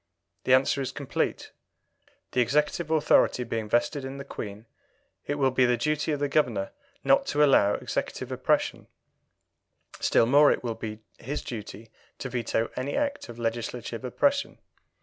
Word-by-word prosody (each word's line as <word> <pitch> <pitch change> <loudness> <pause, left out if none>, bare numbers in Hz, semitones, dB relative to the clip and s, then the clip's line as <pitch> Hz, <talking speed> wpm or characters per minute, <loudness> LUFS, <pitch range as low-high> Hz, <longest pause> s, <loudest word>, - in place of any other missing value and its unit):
The 130 - +4
answer 135 +1 +2
is 130 - -3
complete. - - -3 0.8
The 125 - +2
executive 150 +6 +1
authority 155 -5 +3
being 115 -2 -4
vested 135 +5 +1
in 135 +1 -6
the 140 - -7
Queen, 105 -4 -7 0.6
it 145 - -1
will 135 -2 +2
be 130 0 +3
the 120 0 +2
duty 150 +4 0
of 145 - -1
the 145 - +1
Governor 120 -9 0 0.3
not 275 0 +3
to 150 +1 +3
allow 105 -8 +5
executive - - -4
oppression; - - 0 1.1
still - - +3
more 145 +4 +5
will 120 - -2
it - - -18
be 110 -1 -6 0.2
his 145 +5 -4
duty 110 -1 -8 0.3
to 130 - -5
veto 115 -2 -1
any 130 +3 -3
act 285 - -2
of 120 - -9
legislative 120 +1 -4
oppression. 280 - 0
130 Hz, 155 wpm, -27 LUFS, 115-145 Hz, 1.1 s, allow